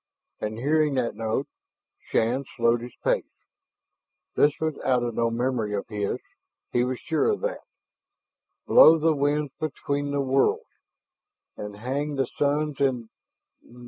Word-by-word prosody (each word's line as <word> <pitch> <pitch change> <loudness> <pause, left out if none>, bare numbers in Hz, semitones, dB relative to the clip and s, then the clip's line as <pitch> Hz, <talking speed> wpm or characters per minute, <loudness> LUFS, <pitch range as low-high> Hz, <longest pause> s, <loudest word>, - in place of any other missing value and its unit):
And 105 +1 -4
hearing 150 +3 +2
that 125 -3 0
note, 115 +4 -1 0.6
Shann 120 +5 +1
slowed 115 0 +3
his 120 0 -9
pace. - - +2 1.1
This 145 0 +4
was 160 -2 -2
out 125 -2 +2
of 120 -1 -2
no 115 +1 +1
memory 115 -3 -1
of 100 - -4
his; 105 -2 -2 0.5
he 120 - +2
was 125 0 -2
sure 160 - 0
of 425 - 0
that. - - -3 0.6
"... - - -56
blow 165 - +8
the 160 0 +2
winds 145 0 0
between 145 -2 -2
the 140 0 -1
worlds, 135 0 +2 0.9
And 105 0 -7
hang 140 +7 -3
the 135 -1 +1
suns 145 +2 -1
in 125 -5 0
135 Hz, 145 wpm, -25 LUFS, 115-145 Hz, 1.1 s, blow